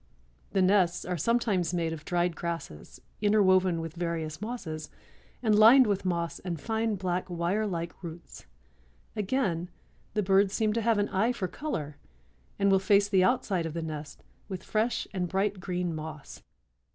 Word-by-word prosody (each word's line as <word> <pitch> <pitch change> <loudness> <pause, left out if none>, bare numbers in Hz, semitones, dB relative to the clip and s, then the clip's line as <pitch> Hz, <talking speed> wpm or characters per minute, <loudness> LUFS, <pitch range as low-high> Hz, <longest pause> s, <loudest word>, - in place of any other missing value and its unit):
The 190 - +3
nests 185 -2 +3
are 180 - -2
sometimes 190 - +1
made 165 -2 -1
of 155 -2 -9
dried 175 -1 0
grasses 165 - -6 0.2
interwoven 185 -4 +4
with 165 -1 -5
various 165 -2 -3
mosses 165 -10 -5 0.5
and 220 -2 +3
lined 230 +5 +8
with 200 -3 -1
moss 170 -2 -1
and 175 -3 -4
fine 220 +3 -1
black 185 -1 -2
wire 175 +5 0
like 170 -2 -4
roots. 170 - -10 0.7
Again, 195 -6 -1 0.5
the 210 - +2
birds 195 +1 +3
seem 215 -2 +1
to 230 - 0
have 225 -1 +2
an 205 0 +1
eye 220 +6 +1
for 195 -6 -3
color 160 - -5 0.6
and 200 0 +3
will 195 - +5
face 200 +1 +3
the 190 -2 +4
outside 190 -7 +1
of 160 - -7
the 165 - -2
nest 155 -2 -7 0.3
with 185 -1 -5
fresh 225 +2 0
and 180 -2 -2
bright 195 +1 0
green 180 -2 -2
moss. 155 -2 -8
185 Hz, 165 wpm, -29 LUFS, 170-210 Hz, 0.7 s, lined